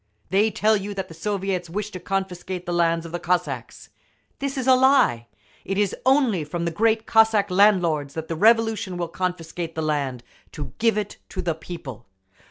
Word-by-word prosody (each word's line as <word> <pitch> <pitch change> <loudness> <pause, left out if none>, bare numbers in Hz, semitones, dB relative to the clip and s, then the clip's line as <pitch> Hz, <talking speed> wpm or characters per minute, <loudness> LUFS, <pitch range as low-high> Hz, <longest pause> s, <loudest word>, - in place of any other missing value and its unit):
They 205 +3 +4
tell 215 +1 +2
you 200 0 -4
that 190 -1 -4
the - - -10
Soviets 190 0 -2
wish 210 +4 -4
to 185 - -7
confiscate 185 -1 -4
the 175 - -3
lands 170 -1 +1
of 165 - -8
the 175 - -3
Cossacks. 180 +2 -2 0.5
This 275 0 -3
is 260 - -2
a 260 - +6
lie. 255 - +4 0.4
It 195 - -3
is 205 -2 +1
only 260 - +3
from 170 +3 -4
the 170 - -1
great 220 +5 +1
Cossack 220 -3 +4
landlords 175 -7 +3
that 160 0 -5
the 165 - -3
Revolution 225 -1 +2
will 175 -1 -2
confiscate 170 -2 -4
the 160 - -2
land 140 -5 -2 0.3
to 145 -3 -7
give 225 -1 +2
it 210 -1 -3
to - - -4
the 170 - 0
people. 150 - -9
185 Hz, 185 wpm, -23 LUFS, 165-215 Hz, 0.5 s, a